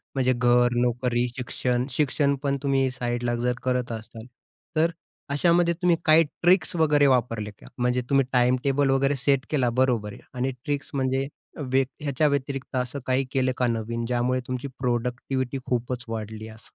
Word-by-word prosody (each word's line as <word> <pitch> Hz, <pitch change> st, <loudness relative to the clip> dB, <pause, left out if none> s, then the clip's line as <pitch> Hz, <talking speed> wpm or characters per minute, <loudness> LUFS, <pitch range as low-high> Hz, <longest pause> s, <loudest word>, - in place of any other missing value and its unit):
म्हणजे 130 Hz, -1 st, +2 dB
घर, 120 Hz, 0 st, +3 dB
नोकरी, 125 Hz, 0 st, +1 dB
शिक्षण. 125 Hz, 0 st, -1 dB
शिक्षण 140 Hz, +1 st, +1 dB
पण 140 Hz, 0 st, +1 dB
तुम्ही 135 Hz, -1 st, +2 dB
साइडला 120 Hz, -1 st, -2 dB
जर 125 Hz, +1 st, 0 dB
करत 125 Hz, -1 st, 0 dB
असाल. 110 Hz, 0 st, -8 dB, 0.5 s
तर 160 Hz, +2 st, +3 dB, 0.4 s
अशामध्ये 170 Hz, +3 st, +3 dB
तुम्ही 175 Hz, 0 st, +2 dB
काही 160 Hz, +1 st, +7 dB
ट्रिक्स 175 Hz, +5 st, +1 dB
वगैरे 150 Hz, -3 st, +4 dB
वापरले 115 Hz, -5 st, +1 dB
का? -, -, -15 dB
म्हणजे 125 Hz, 0 st, +1 dB
तुम्ही 135 Hz, -1 st, +4 dB
टाईम 125 Hz, 0 st, +4 dB
टेबल 140 Hz, 0 st, +2 dB
वगैरे 135 Hz, +1 st, +2 dB
सेट 135 Hz, -1 st, +1 dB
केला 130 Hz, -5 st, +2 dB
बरोबर 120 Hz, -5 st, +1 dB
आहे. -, -, -13 dB
आणि 130 Hz, +1 st, -1 dB
ट्रिक्स 145 Hz, -1 st, -2 dB
म्हणजे 135 Hz, 0 st, 0 dB, 0.4 s
व्यत 135 Hz, 0 st, +3 dB, 0.2 s
ह्याच्या 150 Hz, +1 st, +1 dB
व्यतिरिक्त 140 Hz, -1 st, -2 dB
असं 125 Hz, +2 st, -2 dB
काही 130 Hz, +1 st, +1 dB
केलं 130 Hz, -1 st, +1 dB
का 125 Hz, -, +2 dB
नवीन, 115 Hz, 0 st, -2 dB
ज्यामुळे 125 Hz, +1 st, 0 dB
तुमची 125 Hz, +2 st, -3 dB
प्रॉडक्टिव्हिटी 125 Hz, +2 st, -1 dB
खूपच 120 Hz, 0 st, -2 dB
वाढली 110 Hz, -1 st, -5 dB
असं? 110 Hz, 0 st, -11 dB
130 Hz, 160 wpm, -25 LUFS, 120-140 Hz, 0.5 s, काही